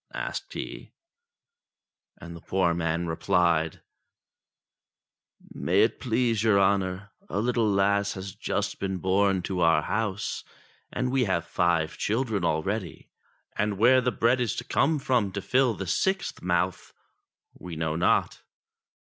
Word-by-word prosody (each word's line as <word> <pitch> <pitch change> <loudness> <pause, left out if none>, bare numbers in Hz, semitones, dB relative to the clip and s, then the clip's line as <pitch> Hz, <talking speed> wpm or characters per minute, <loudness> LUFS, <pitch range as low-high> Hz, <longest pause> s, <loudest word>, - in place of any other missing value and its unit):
asked - - -5
he, - - -7 1.3
and 85 0 -10
the 85 - -11
poor 90 -1 +1
man 85 0 -1
rephed: 80 -1 +1 1.7
"May - - +2
it - - 0
please 115 -2 0
your 110 -3 +4
honour, 95 0 0 0.2
a - - -6
Httle 115 0 +1
lass 100 +1 +2
has 95 0 -7
just - - -3
been 95 -1 -2
born 95 0 +1
to 90 +1 -3
our 80 -3 +4
house; 105 -1 -2 0.5
and 125 0 -2
we 130 -2 +2
have 85 -4 -1
five 85 -3 0
children 110 -3 -1
already, 85 +4 -2 0.4
and 105 -1 -1
where 125 +5 +5
the 125 0 0
bread 120 +2 +2
is 120 -4 -1
to - - -4
come 155 +3 +1
from 125 -8 0
to 100 - -2
fill 125 +2 +2
the 95 - -5
sixth 190 - -1
mouth, 90 0 -1 0.6
we 90 -2 -9
know 80 0 -2
not.' 85 - +1
100 Hz, 140 wpm, -27 LUFS, 85-115 Hz, 1.7 s, where